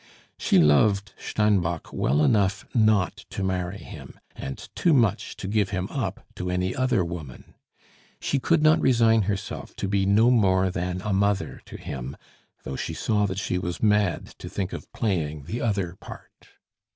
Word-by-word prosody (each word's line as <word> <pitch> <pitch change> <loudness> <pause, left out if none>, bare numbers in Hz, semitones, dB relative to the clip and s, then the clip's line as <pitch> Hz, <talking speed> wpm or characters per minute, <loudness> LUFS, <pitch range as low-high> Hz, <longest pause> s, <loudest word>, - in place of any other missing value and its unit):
She - - +3
loved 100 +7 +4
Steinbock 95 -6 0
well 75 +4 +2
enough 100 +1 +2
not 110 -5 +3
to 100 - -4
marry 95 0 -2
him, - - -11 0.2
and 65 - -6 0.2
too 170 - +2
much 115 -6 +1
to 95 - -5
give 105 -1 +1
him 95 -1 -2
up - - -3
to 90 - -3
any 90 +1 -1
other 130 -8 +1
woman; 80 -7 -8 0.7
she 140 - 0
could 155 +4 +2
not 155 0 +5
resign 115 -3 +4
herself 100 -1 -4
to - - -3
be 95 0 +1
no 110 +5 +5
more 95 -5 +3
than 90 0 -3
a 105 - -1
mother 100 0 0
to - - -9
him, 65 +1 -6 0.5
though 65 - -5
she - - -4
saw 105 -2 +1
that 95 -1 -4
she 90 -2 -1
was 90 +2 -4
mad 105 -3 +2
to - - -7
think 95 -2 -3
of - - -8
playing 80 - -2
the 115 - -4
other 100 -6 -1
part. - - -13
100 Hz, 170 wpm, -25 LUFS, 90-110 Hz, 0.7 s, not